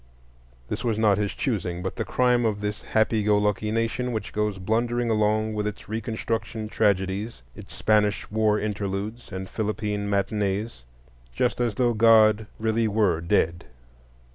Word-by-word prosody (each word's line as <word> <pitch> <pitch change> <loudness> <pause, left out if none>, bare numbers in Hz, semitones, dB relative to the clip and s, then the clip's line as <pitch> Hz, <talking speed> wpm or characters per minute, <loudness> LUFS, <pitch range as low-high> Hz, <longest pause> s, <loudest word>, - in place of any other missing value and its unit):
This - - -4
was 115 -3 0
not 105 -3 +3
his 105 -1 -2
choosing, 90 -9 -2
but 95 - -3
the - - -2
crime 125 -1 +2
of 110 -3 0
this 105 0 -3
happy 110 0 +1
go 105 0 +3
lucky 105 +1 0
nation 115 +3 -1
which 110 -2 -4
goes 105 -2 -1
blundering 115 +4 0
along 110 0 +1
with 105 0 -1
its 105 - -7
Reconstruction 110 0 -3
tragedies, 100 - 0
its - - -11
Spanish 105 -2 +1
war 110 -1 +2
interludes 105 +2 -4
and 95 0 -5
Philippine 105 -1 -2
matinees, 100 - -1 0.5
just 120 - 0
as 120 -4 0
though 120 -2 +2
God 110 -1 +5
really 110 +1 +1
were 100 -6 +1
dead. 85 0 +1
105 Hz, 150 wpm, -25 LUFS, 100-110 Hz, 0.5 s, God